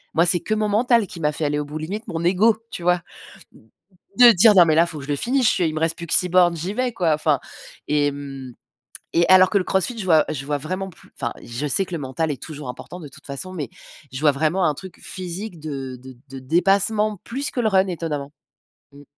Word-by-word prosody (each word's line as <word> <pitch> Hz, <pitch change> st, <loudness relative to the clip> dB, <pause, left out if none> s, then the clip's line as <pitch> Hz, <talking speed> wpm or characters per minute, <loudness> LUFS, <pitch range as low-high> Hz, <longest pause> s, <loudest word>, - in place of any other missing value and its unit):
moi, 165 Hz, +2 st, +4 dB
c'est 175 Hz, 0 st, +4 dB
que 215 Hz, -, -2 dB
mon 215 Hz, 0 st, 0 dB
mental 230 Hz, +2 st, +2 dB
qui 180 Hz, -, -10 dB
m'a 150 Hz, -2 st, +1 dB
fait 150 Hz, +1 st, -3 dB
aller 145 Hz, 0 st, 0 dB
au 150 Hz, -, -3 dB
bout, 150 Hz, +2 st, -7 dB
limite 195 Hz, +8 st, -5 dB
mon 165 Hz, 0 st, -4 dB
ego, 200 Hz, +5 st, +3 dB
tu -, -, -6 dB
vois 175 Hz, 0 st, +1 dB, 1.1 s
de 245 Hz, -1 st, +9 dB
dire: 210 Hz, +1 st, +6 dB
«Non 180 Hz, -2 st, +8 dB
mais 160 Hz, -2 st, +2 dB
là, 165 Hz, +2 st, +5 dB
faut 170 Hz, -2 st, -7 dB
que -, -, -9 dB
je -, -, -13 dB
le 145 Hz, -, +1 dB
finisse, 255 Hz, -, 0 dB
je -, -, +5 dB
suis, 180 Hz, -, 0 dB
il 155 Hz, -, -3 dB
me -, -, -2 dB
reste 165 Hz, 0 st, 0 dB
plus 170 Hz, -, -8 dB
que -, -, -1 dB
6 180 Hz, -, +4 dB
bornes, 175 Hz, -1 st, +4 dB
j'y 175 Hz, +5 st, -4 dB
vais, 250 Hz, +1 st, -1 dB
quoi». 170 Hz, -7 st, +1 dB
Enfin 150 Hz, -2 st, +1 dB, 0.5 s
et 145 Hz, -1 st, +1 dB
mmh 135 Hz, -3 st, -8 dB, 0.6 s
et 170 Hz, 0 st, +4 dB
alors 185 Hz, 0 st, +7 dB
que -, -, -1 dB
le 190 Hz, -, +2 dB
CrossFit, 190 Hz, +7 st, 0 dB
je 215 Hz, -, -5 dB
vois 160 Hz, -4 st, +4 dB
je 135 Hz, -3 st, -4 dB
vois 145 Hz, +1 st, -2 dB
vraiment 185 Hz, +6 st, -4 dB
plus 165 Hz, -, -20 dB
enfin 120 Hz, -, -2 dB
je 120 Hz, +5 st, -5 dB
sais 190 Hz, +7 st, +2 dB
que 180 Hz, -, -7 dB
le -, -, -2 dB
mental 145 Hz, +3 st, -3 dB
est 135 Hz, -4 st, -5 dB
toujours 150 Hz, -4 st, -8 dB
important 150 Hz, +8 st, -8 dB
de 150 Hz, -, -9 dB
toute 135 Hz, -, -16 dB
façon 150 Hz, +7 st, -6 dB
mais 145 Hz, -8 st, -5 dB, 0.4 s
je 135 Hz, -, -5 dB
vois 150 Hz, -1 st, +4 dB
vraiment 160 Hz, +6 st, 0 dB
un 150 Hz, -, +1 dB
truc 185 Hz, +4 st, -11 dB
physique 185 Hz, +1 st, -6 dB
de 135 Hz, -4 st, -6 dB
de 130 Hz, +1 st, -13 dB
de 135 Hz, 0 st, -8 dB
dépassement, 200 Hz, -, +2 dB
plus 275 Hz, +4 st, -3 dB
que -, -, -7 dB
le 225 Hz, -, +2 dB
run, 190 Hz, -2 st, +3 dB
étonnamment 155 Hz, -6 st, -4 dB, 0.6 s
mmh. 140 Hz, +1 st, -15 dB
170 Hz, 255 wpm, -22 LUFS, 145-190 Hz, 1.1 s, de